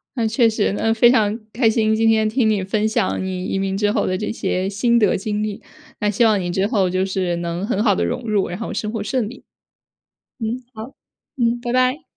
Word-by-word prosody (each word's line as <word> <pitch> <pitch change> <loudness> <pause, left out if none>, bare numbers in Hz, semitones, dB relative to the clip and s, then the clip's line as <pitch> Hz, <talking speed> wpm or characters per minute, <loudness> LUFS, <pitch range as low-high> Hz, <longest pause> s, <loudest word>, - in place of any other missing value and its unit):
那 230 -3 0
确 230 +1 +3
实。 215 -2 0
那 225 - +1
非 230 +2 +5
常 220 -2 +2
开 230 -1 +3
心， 220 -1 +2
今 225 +1 +3
天 220 -1 +3
听 220 0 +1
你 210 -2 +1
分 210 +3 -1
享 195 -3 0
你 185 -1 -4
移 195 - -2
民 195 0 -1
之 205 0 +1
后 210 - 0
的 185 - -1
这 210 - -3
些 190 -3 -1
心 235 +4 +2
得 210 -4 +3
经 210 +2 -2
历， 210 -1 -4 0.4
那 210 - +2
希 210 +3 +2
望 215 -2 +3
你 175 -1 -3
之 190 +3 +1
后 200 -5 +1
就 185 +1 0
是 185 -2 -1
能 170 +2 -3
很 210 -2 -1
好 210 -3 +3
地 - - 0
融 250 - -3
入， 205 -2 +1
然 180 +2 -6
后 230 - -4
生 210 - -3
活 225 -2 -3
顺 220 +1 -1
利。 255 - -13 0.9
嗯， 235 +1 -3
好， 220 +5 -9 0.4
嗯， 235 -1 +1
拜 240 - -3
拜。 255 +4 +1
215 Hz, 250 characters per minute, -20 LUFS, 195-230 Hz, 0.9 s, 非